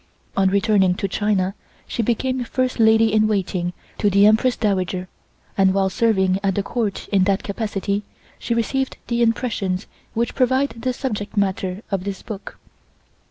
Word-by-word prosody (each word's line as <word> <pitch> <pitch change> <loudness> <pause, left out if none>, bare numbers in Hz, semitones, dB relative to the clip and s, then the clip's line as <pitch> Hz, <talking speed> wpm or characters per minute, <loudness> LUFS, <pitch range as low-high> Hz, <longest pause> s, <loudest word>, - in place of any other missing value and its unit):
On 190 -1 +3
returning 200 -2 +3
to 195 - -2
China, 195 -1 0 0.3
she - - -2
became 250 +3 0
First 255 +1 -1
Lady 220 0 +5
in 215 0 +4
Waiting 185 -4 -1 0.3
to 205 - +3
the 200 +1 +5
Empress 225 +4 +4
Dowager, 185 -3 -1 0.5
and 190 -1 +3
while 195 -1 +2
serving 190 -5 +2
at 195 -2 0
the 200 - 0
Court 215 -2 -2
in 195 -2 +3
that 195 0 +1
capacity 200 -1 -2 0.4
she 235 - -1
received 265 +3 -1
the 235 0 +1
impressions 225 -5 0 0.3
which 235 +1 0
provide 260 +2 +2
the 255 +2 -3
subject 220 -5 -4
matter 190 0 -1
of 195 -2 -1
this 200 -1 -5
book. 210 -4 -8
205 Hz, 160 wpm, -21 LUFS, 195-230 Hz, 0.5 s, Lady